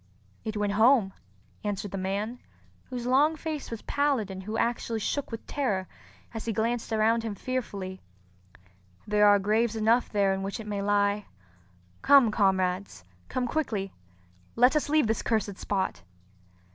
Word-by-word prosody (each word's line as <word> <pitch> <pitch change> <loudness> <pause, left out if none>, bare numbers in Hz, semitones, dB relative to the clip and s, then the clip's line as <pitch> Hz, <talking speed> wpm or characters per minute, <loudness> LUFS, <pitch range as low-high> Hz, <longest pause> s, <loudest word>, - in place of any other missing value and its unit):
"It 215 -1 -4
went 205 -1 0
home," 220 -2 +4 0.5
answered 205 -1 -3
the 195 - -4
man, 205 +6 -3 0.5
whose 245 -2 -6
long 285 +5 +4
face 310 -2 -5
was 230 -2 -6
pallid 275 -8 0
and 190 0 -6
who 215 +3 -4
actually 230 -1 -1
shook 285 +6 -2
with 230 -1 -7
terror 205 -10 -1 0.5
as 225 - -5
he 225 - -1
glanced 230 +2 -1
around 225 +1 +3
him 225 -2 -4
fearfully. 200 -6 -4 1.0
"There 210 0 +4
are 205 0 +7
graves 215 +3 +1
enough 225 +3 +2
there 200 -2 +2
in 190 - -3
which 195 +2 -4
it 220 - -7
may 205 -1 -3
lie. 205 0 +1 0.7
Come, 275 -6 +6
comrades—come 185 - -1
quickly! 225 -8 -2 0.6
Let 250 +5 +5
us 300 - +1
leave 305 -2 +4
this 220 0 0
cursed 210 -4 -1
spot." 190 - -2
215 Hz, 150 wpm, -28 LUFS, 200-240 Hz, 1.0 s, are